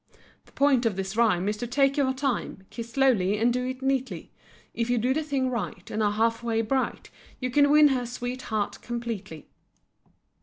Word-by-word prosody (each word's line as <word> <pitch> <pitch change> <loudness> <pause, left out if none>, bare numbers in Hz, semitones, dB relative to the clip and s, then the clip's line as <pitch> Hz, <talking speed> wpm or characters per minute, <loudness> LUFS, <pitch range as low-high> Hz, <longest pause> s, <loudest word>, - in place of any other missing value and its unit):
The - - -20
point 270 -4 +3
of 210 - -1
this 195 +1 -4
rhyme 210 -5 +2
is 210 0 -1
to 240 - -4
take 275 +2 +2
your 275 -2 +2
time, 260 -7 -2
Kiss 235 -1 -7
slowly 225 -7 +2
and 235 +3 +2
do 250 0 -1
it 260 +1 -5
neatly; 270 -1 -2 0.4
If 230 0 -2
you 245 - +2
do 250 +3 +1
the 310 - 0
thing 275 -4 -1
right 210 -5 -5
and 215 - -1
are 205 -1 +2
halfway 230 +1 0
bright, 260 +4 -2 0.3
You 255 -1 -2
can 285 +2 +4
win 300 0 +7
her 250 -3 -1
sweet 245 +1 -5
heart 215 -2 -2
completely. 225 -9 -6
240 Hz, 190 wpm, -26 LUFS, 220-265 Hz, 0.4 s, win